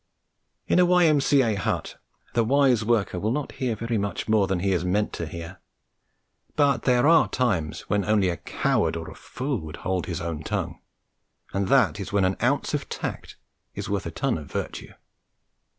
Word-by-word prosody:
In - - +3
a 180 - +6
Y.M.C.A. 145 -8 +4
hut 100 -3 -2 0.4
the 115 - +3
wise 130 -2 +3
worker 110 -5 +1
will 105 - -1
not 140 +4 -2
hear 125 -4 -2
very 115 0 -2
much 100 0 -3
more 110 -3 +3
than 95 -2 -1
he 100 +1 +1
is 90 -2 +1
meant 100 +4 0
to 85 - -4
hear; 85 +3 -8 1.0
but 140 -3 +3
there 125 0 +4
are 165 +1 +6
times 100 - -1
when 100 -1 -1
only 105 -2 +2
a 85 - -2
coward - - 0
or 80 -1 -6
a - - -12
fool 130 +1 -4
would 80 0 -8
hold 95 -1 -1
his 85 -2 -3
own 80 -3 -4
tongue, - - -3 0.7
and 100 -1 0
that 125 - +3
is 100 - -5
when 100 -2 +2
an 95 +1 +1
ounce - - +1
of - - -2
tact - - -5 0.4
is - - -5
worth - - -1
a - - -2
ton - - -1
of 75 - -11
virtue. - - -5
105 Hz, 185 wpm, -25 LUFS, 90-125 Hz, 1.0 s, a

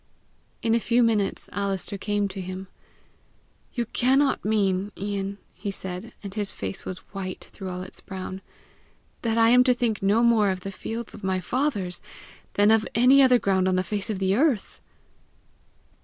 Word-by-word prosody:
In 225 -1 +2
a 235 - +4
few 240 +1 +3
minutes, 215 -4 +1
Alister 200 0 -2
came 205 +1 0
to 190 - -5
him. 185 +1 -6 1.1
"You 240 -2 0
cannot 265 +5 +2
mean, 200 -2 +1
Ian," 200 0 -3 0.2
he 200 +2 -5
said 190 +3 -6
and 200 -2 -6
his 205 -1 -2
face 190 - -5
was 185 - -6
white 185 -2 -5
through 190 -2 -7
all 180 0 -4
its 185 - -11
brown, 190 -1 -6 0.8
"that 230 -1 0
I 225 0 +6
am 250 +1 +7
to 250 -1 +4
think 230 -4 0
no 205 +4 +3
more 225 -4 +4
of 185 -1 -2
the 195 - -5
fields 225 +3 -5
of - - -11
my 190 -1 0
fathers 200 -7 -1 0.5
than 205 +1 +4
of 220 0 +3
any 255 +4 +7
other 255 -2 +6
ground 190 -4 +1
on 185 - +2
the 185 - +2
face 205 +3 -3
of 210 - -1
the 190 0 +1
earth!" 265 -4 +1
205 Hz, 175 wpm, -25 LUFS, 190-230 Hz, 1.1 s, am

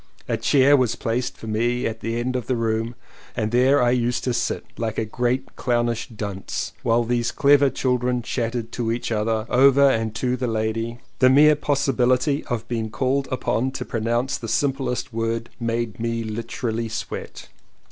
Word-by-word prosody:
A - - 0
chair 140 +1 +4
was 125 -4 +2
placed 120 +2 -2
for - - -10
me 120 +3 0
at 110 0 -3
the 115 +1 -2
end 130 +2 -2
of 125 - -3
the 130 - +1
room 115 0 -1 0.4
and 110 0 -1
there 130 +4 +4
I 120 - +3
used 120 -1 0
to 125 - 0
sit 120 0 -1
— - - -38
like 115 -2 -2
a 110 - 0
great 125 +4 -2
clownish 120 -1 0
dunce 100 -4 -4
— - - -31
while 120 0 +2
these 120 0 0
clever 140 0 +4
children 125 -2 0
chattered 115 -1 -3
to 115 -2 -2
each 120 0 -3
other 110 0 0
and 130 -4 +4
to 125 +1 0
the 125 0 -2
lady. 115 +1 -2 0.2
The 130 - +6
mere 150 +3 +6
possibility 140 -1 +1
of 115 -3 -3
being 115 -2 -2
called 135 +4 0
upon 130 0 0
to - - -4
pronounce 120 +3 -1
the 115 - -6
simplest 130 -1 -1
word 115 +1 -2
made 115 -2 -2
me 115 0 -1
literally 115 +1 -3
sweat. 115 - -6
120 Hz, 175 wpm, -23 LUFS, 115-130 Hz, 0.4 s, The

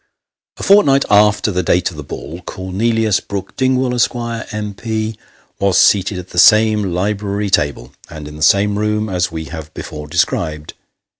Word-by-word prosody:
A - - -8
fortnight 145 -9 +4
after 105 +1 +4
the 90 -1 0
date 90 +1 +1
of - - -12
the - - -5
ball, 85 +5 -8
Cornelius 105 +4 -1
Brook 100 -2 -7
Dingwall, 130 -1 +1
Esq., 120 0 +1
M.P., 110 -1 -4 0.4
was 100 -2 +2
seated 100 -1 +3
at 90 0 -8
the 90 - -1
same 110 +2 +5
library 100 +2 -2
table, 70 -7 0 0.2
and 75 -2 -9
in 75 - -10
the 75 - -11
same 100 +4 +3
room, 105 0 -1
as 90 -2 -1
we 80 -1 -5
have 80 0 -8
before 75 -1 -7
described. 80 -2 -1
100 Hz, 160 wpm, -17 LUFS, 90-110 Hz, 0.4 s, same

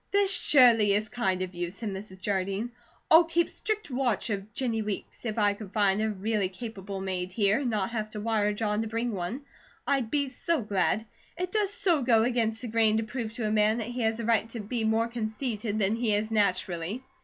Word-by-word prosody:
"This 400 -1 +2
surely 230 -7 +6
is 210 +1 0
kind 190 -6 0
of 185 0 -6
you," 175 0 -3
said 205 +4 -5
Mrs. 190 -1 -7
Jardine. 195 +3 -1 0.4
"I'll 325 +2 +9
keep 335 +1 0
strict 425 -8 -3
watch 245 -4 0
of 200 +1 -4
Jennie 230 -1 -1
Weeks. 210 +3 -6
If 215 0 -3
I 205 -2 +3
could 200 -2 -10
find 205 -1 +2
a 220 - +1
really 210 -1 -1
capable 200 -1 -7
maid 185 -1 -3
here 200 +3 +2
and 270 -3 -1
not 210 -2 -1
have 215 -2 -3
to 215 - -7
wire 210 -1 +1
John 210 0 -1
to 225 - -3
bring 230 +2 -2
one, 200 +7 -4 0.4
I'd 270 -5 0
be 285 +2 0
so 310 +2 -1
glad. 205 +2 0 0.3
It 360 +1 -3
does 420 -2 +1
so 345 -7 +2
go 230 -3 +4
against 230 -1 0
the - - -3
grain 220 -1 +3
to 225 - 0
prove 220 0 -5
to 230 -1 -3
a - - -1
man 215 +1 +3
that 230 -1 -3
he 245 +1 -4
has 220 0 0
a 230 - -3
right 225 -1 +2
to 230 - -6
be 225 +2 -3
more 220 +1 +2
conceited 220 -1 -3
than 210 +1 +2
he 225 -3 +1
is 215 +2 -1
naturally." 200 0 0
220 Hz, 220 wpm, -28 LUFS, 205-240 Hz, 0.4 s, I'll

